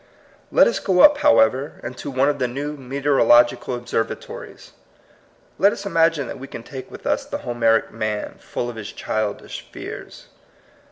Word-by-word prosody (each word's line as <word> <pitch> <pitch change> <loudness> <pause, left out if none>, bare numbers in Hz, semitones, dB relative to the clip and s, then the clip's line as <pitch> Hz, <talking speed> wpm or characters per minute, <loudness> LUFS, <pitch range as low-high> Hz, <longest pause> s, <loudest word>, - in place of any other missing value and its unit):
Let - - +6
us - - 0
go 185 -3 +2
up, 295 -1 +7
however, 275 - +3
into 125 +3 -6
one 135 0 +2
of 145 -1 0
the 125 - +1
new 145 +4 -4
meteorological 130 -3 +3
observatories. 475 - -5 0.9
Let 200 +2 +5
us 200 - -8
imagine 165 -5 +2
that 130 - -7
we 135 - -8
can 115 - -8
take 130 +2 -9
with - - -12
us - - +1
the - - -5
Ho 120 - -2
meric 115 -1 +2
man, 110 -2 -4
full 120 - -4
of 120 -2 -7
his 105 -2 -6
childish 110 -2 -3
fears. - - -9
135 Hz, 165 wpm, -22 LUFS, 120-165 Hz, 0.9 s, up